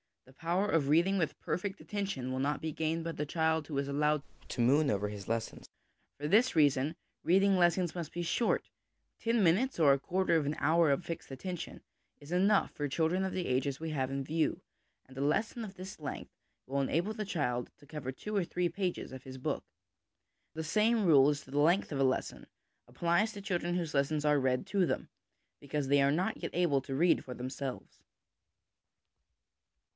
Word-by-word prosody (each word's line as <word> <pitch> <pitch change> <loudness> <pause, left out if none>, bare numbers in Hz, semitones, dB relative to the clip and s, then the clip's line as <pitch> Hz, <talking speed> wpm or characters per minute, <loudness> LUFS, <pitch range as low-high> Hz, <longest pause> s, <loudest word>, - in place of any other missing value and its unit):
The 130 - -18
power 175 +7 0
of 160 -8 +1
reading 170 +7 +3
with 160 -4 -1
perfect 195 +2 -3
attention 195 - -3
will 130 - -2
not 145 +2 0
be 160 - -2
gained 160 +2 -1
by 165 - -3
the 150 -2 -3
child 160 0 0
who 145 - -4
is 140 0 -1
allowed 150 +1 +1 0.3
to 120 - -2
moon 140 +5 +4
over 105 -2 0
his 100 -2 -8
lessons. 115 0 -3 0.5
For 145 - -2
this 225 +8 +4
reason, 145 0 +3 0.3
reading 195 +3 +4
lessons 175 -1 +2
must 170 -4 -5
be 175 - -3
short; 225 +7 0 0.5
ten 230 -2 +1
minutes 200 +11 +3
or 150 -4 +6
a 135 - +1
quarter 180 +2 +1
of 155 - 0
an 145 +2 -1
hour 165 0 +3
of 140 +5 +1
fixed 165 - -6
attention 175 +6 -6 0.4
is 145 +2 -13
enough 195 +3 +3
for 145 - -3
children 165 +6 +1
of 190 - -2
the 180 - -2
ages 130 +2 0
we 160 0 -4
have 130 -3 -1
in 135 0 -2
view, 155 +3 0 0.4
and 130 0 -16
a - - -2
lesson 215 - 0
of 200 -3 -8
this 185 -1 -9
length 145 -2 -6 0.3
will 140 +1 -1
enable 175 - -1
a 215 - -1
child 125 -10 -1
to 145 - -18
cover 140 -3 -5
two 210 +10 -6
or 195 -3 +2
three 175 0 -1
pages 185 -2 -3
of 130 0 -9
his 130 0 -9
book. 130 - -3 0.9
The 160 - -4
same 215 +6 +2
rule 145 -4 +6
as 145 -1 -1
to 130 - -15
the 145 - 0
length 170 +6 +3
of 140 - -2
a - - +4
lesson 130 - -2 0.4
applies 175 +6 +1
to 200 - -7
children 175 -3 -1
whose 170 -4 -2
lessons 145 +2 +1
are 150 -1 +4
read 130 +4 0
to 195 -1 +2
them - - -2 0.5
because 140 -1 -3
they 140 0 +5
are 140 - +4
not 185 +8 0
yet - - -3
able 165 -6 +2
to 135 0 -5
read 170 +5 +3
for 125 - -7
themselves. 130 +1 -6
160 Hz, 200 wpm, -32 LUFS, 140-180 Hz, 0.9 s, or